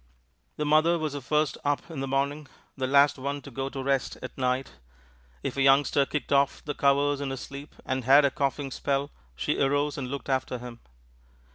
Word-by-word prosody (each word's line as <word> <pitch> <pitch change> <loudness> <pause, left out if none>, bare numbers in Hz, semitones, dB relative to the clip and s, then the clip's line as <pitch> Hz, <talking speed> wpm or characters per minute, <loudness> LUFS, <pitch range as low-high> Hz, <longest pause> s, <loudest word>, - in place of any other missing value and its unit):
The 150 - -1
mother 155 +3 +4
was 155 -3 -3
the 145 - -5
first 150 +2 0
one 145 - +2
up 155 - -10
in 155 - -5
the 135 - -2
morning, 140 +2 -1 0.3
the 130 -1 -2
last 140 +1 +4
one 140 +2 -3
to 140 - -10
go 135 +2 -3
to 135 -1 -5
rest 135 -1 0
at 130 - -7
night. 130 0 -1 0.7
If - - -3
a - - +1
youngster 135 +1 +4
kicked 150 -1 -2
off 140 0 +2
the 145 - -2
covers 140 0 +2
in 140 - -2
his 135 -1 -5
sleep 140 +1 -9
and 130 0 -2
had 140 +4 +6
a 140 - +2
coughing 140 0 -2
spell, 140 +2 -1 0.2
she - - -1
arose 145 +1 +1
and 130 - -4
looked 140 +1 -5
after 130 -2 -1
him. 120 -1 -9
140 Hz, 210 wpm, -27 LUFS, 135-145 Hz, 0.7 s, had